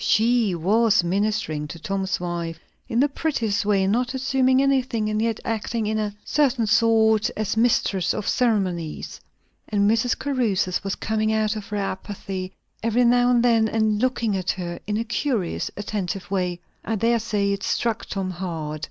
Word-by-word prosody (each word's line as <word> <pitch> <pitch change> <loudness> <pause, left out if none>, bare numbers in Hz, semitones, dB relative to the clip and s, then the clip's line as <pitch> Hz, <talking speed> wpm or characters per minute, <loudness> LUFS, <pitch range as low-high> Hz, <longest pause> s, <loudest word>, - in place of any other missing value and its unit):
She 225 -3 +3
was 210 +4 +3
ministering 175 -5 -1
to 165 - -8
Tom's 190 +2 -2
wife 170 -2 -4 0.3
in 235 -2 0
the 285 - +4
prettiest 270 -9 -1
way; 195 -2 +3
not 245 +6 0
assuming 260 0 +2
anything, 260 -5 +1
and 215 0 0
yet 225 -1 0
acting 225 -1 -2
in 215 +1 0
a 210 -1 -2
certain 265 -6 +2
sort 220 0 +3
as 215 -1 -1
mistress 215 -6 +2
of 215 - -3
ceremonies. 190 - -1 0.5
And 205 -1 +2
Mrs. 230 +3 +2
Caruthers 220 -10 0
was 195 -1 -2
coming 215 0 -1
out 220 0 +1
of 210 -2 -6
her 210 - -3
apathy 190 -1 -4 0.3
every 230 +2 +2
now 245 +1 +4
and 240 -1 +3
then, 230 -2 +4
and 220 -1 +1
looking 240 -5 +1
at 185 -1 -3
her 175 -2 -3
in 210 0 0
a 225 - 0
curious 215 - -1
attentive 195 -3 -4
way. 180 -2 -1 0.2
I 225 - -2
dare 230 +3 +2
say 210 -3 0
it 200 - -4
struck 230 +1 -1
Tom 190 -2 -3
hard. 165 -4 -4
215 Hz, 170 wpm, -23 LUFS, 190-230 Hz, 0.5 s, the